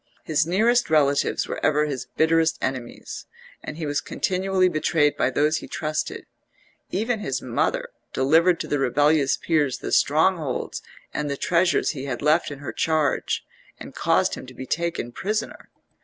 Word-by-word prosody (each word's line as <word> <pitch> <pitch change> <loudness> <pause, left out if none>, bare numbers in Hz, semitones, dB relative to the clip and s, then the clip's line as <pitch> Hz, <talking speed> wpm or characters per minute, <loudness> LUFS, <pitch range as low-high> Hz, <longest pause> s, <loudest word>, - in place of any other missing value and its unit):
His 155 0 +1
nearest 225 +7 +2
relatives 145 -2 +2
were - - -5
ever 150 0 +3
his 140 -4 -4
bitterest 160 0 +3
enemies, 130 -2 -5 0.4
and 150 - -7
he 165 - -4
was 145 -1 -1
continually 190 0 0
betrayed 155 -3 +2
by - - +1
those 150 +4 +2
he - - -7
trusted; 155 -1 -3 0.6
even 225 +4 -1
his - - -2
mother - - -1 0.2
delivered 165 +6 +3
to - - -5
the 145 - 0
rebellious 145 +2 +3
peers 150 -6 +1
the - - -6
strongholds 155 -2 +1 0.3
and 150 -1 -2
the 140 - -2
treasures 175 +3 +2
he 140 -3 -6
had 130 -1 -4
left 155 +3 +3
in 145 - -7
her 140 -1 -7
charge 155 -3 0 0.3
and - - -9
caused - - +2
him - - -7
to 130 - -12
be 130 - -7
taken 170 -5 -2
prisoner. 215 - -4
155 Hz, 160 wpm, -24 LUFS, 140-170 Hz, 0.6 s, ever